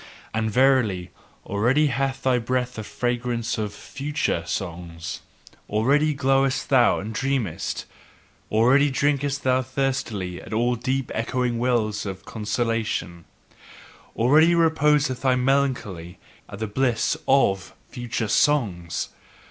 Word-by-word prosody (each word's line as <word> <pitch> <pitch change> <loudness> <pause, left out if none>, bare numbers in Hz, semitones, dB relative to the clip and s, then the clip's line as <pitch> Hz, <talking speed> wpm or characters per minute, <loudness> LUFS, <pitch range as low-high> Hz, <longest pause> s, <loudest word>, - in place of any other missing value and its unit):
And 110 0 0
verily, 120 -7 +2 0.3
already 125 +9 +2
hath 135 +1 -2
thy 130 -2 +3
breath 125 +1 -1
the 110 - -6
fragrance 120 0 -2
of 105 -1 -2
future 135 - -3
songs, 85 -3 -5 0.5
Already 140 +8 +2
glowest 135 0 +1
thou 130 -4 +4
and 110 +3 -5
dreamest, 130 -7 -2 0.7
already 125 +7 +4
drinkest 140 0 0
thou 130 0 +3
thirstily 120 -8 -2
at - - -9
all 120 +3 +2
deep 130 +2 -2
echoing 120 +1 -1
wells 115 -4 0
of 95 -1 -7
consolation, 110 -6 -2 0.9
already 155 +8 +5
reposeth 150 -5 +2
thy 130 -2 +3
melancholy 125 -10 -1 0.3
in 100 - -7
the 110 - -3
bliss 115 +1 0
of 100 -9 +2
future 120 -2 -3
songs! 100 - +1
125 Hz, 115 wpm, -24 LUFS, 105-135 Hz, 0.9 s, already